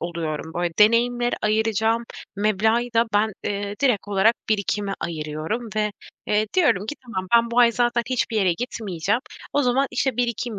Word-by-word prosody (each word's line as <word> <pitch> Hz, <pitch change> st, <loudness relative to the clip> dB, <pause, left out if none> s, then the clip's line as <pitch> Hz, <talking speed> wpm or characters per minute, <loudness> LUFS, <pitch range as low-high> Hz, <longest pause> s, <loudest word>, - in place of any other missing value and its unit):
oluyorum, 160 Hz, -2 st, -4 dB
böyle, 175 Hz, -1 st, -1 dB
deneyimlere 240 Hz, +3 st, +3 dB
ayıracağım 220 Hz, +1 st, +1 dB, 0.3 s
meblağı 215 Hz, +3 st, +2 dB
da 230 Hz, +1 st, +4 dB
ben, 215 Hz, +1 st, +2 dB
eee, 200 Hz, 0 st, -3 dB
direkt 245 Hz, -8 st, +1 dB
olarak 205 Hz, +3 st, +3 dB
birikime 205 Hz, -1 st, 0 dB
ayırıyorum 160 Hz, +8 st, -4 dB
ve, 210 Hz, -1 st, 0 dB, 0.3 s
eee, 210 Hz, +1 st, +1 dB
diyorum 250 Hz, -, +3 dB
ki: 300 Hz, -, -4 dB
"Tamam, 190 Hz, -6 st, -4 dB
ben 235 Hz, 0 st, +4 dB
bu 235 Hz, -, 0 dB
ay 235 Hz, -1 st, +6 dB
zaten 240 Hz, 0 st, +1 dB
hiçbir 245 Hz, -2 st, 0 dB
yere 190 Hz, -4 st, +3 dB
gitmeyeceğim. 205 Hz, -1 st, -2 dB, 0.3 s
O 290 Hz, -, +2 dB
zaman, 260 Hz, +2 st, +2 dB
işte, 250 Hz, 0 st, -1 dB
birikim 235 Hz, -2 st, -2 dB
220 Hz, 160 wpm, -23 LUFS, 195-240 Hz, 0.3 s, ay